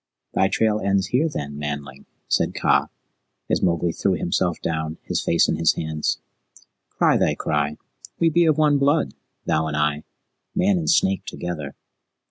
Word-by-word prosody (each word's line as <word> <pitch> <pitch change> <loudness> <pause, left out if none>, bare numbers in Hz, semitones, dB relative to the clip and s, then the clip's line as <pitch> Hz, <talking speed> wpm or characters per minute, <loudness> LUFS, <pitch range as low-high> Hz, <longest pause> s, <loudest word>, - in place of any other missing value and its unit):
"Thy 95 - +3
trail 110 +1 +1
ends 100 -1 +1
here, 150 +6 +2
then, 70 - -5
Manling?" 70 -2 -6 0.2
said - - +1
Kaa, - - +2 0.6
as - - +2
Mowgli 85 -1 +1
threw 95 +3 0
himself 85 0 0
down, 80 0 -3
his - - -1
face 85 - +3
in - - 0
his 80 0 +3
hands. 80 -1 -2 0.7
"Cry - - +2
thy - - +2
cry. 75 0 -1 0.4
We 165 -1 +3
be 170 +1 +4
of 155 -2 +3
one 150 -2 +3
blood, 145 +3 +2 0.3
thou 80 0 +1
and 75 -1 -3
I 75 0 0 0.5
man 190 0 +2
and 165 - -2
snake 95 - +2
together." 75 -6 -5
85 Hz, 160 wpm, -23 LUFS, -, 0.7 s, be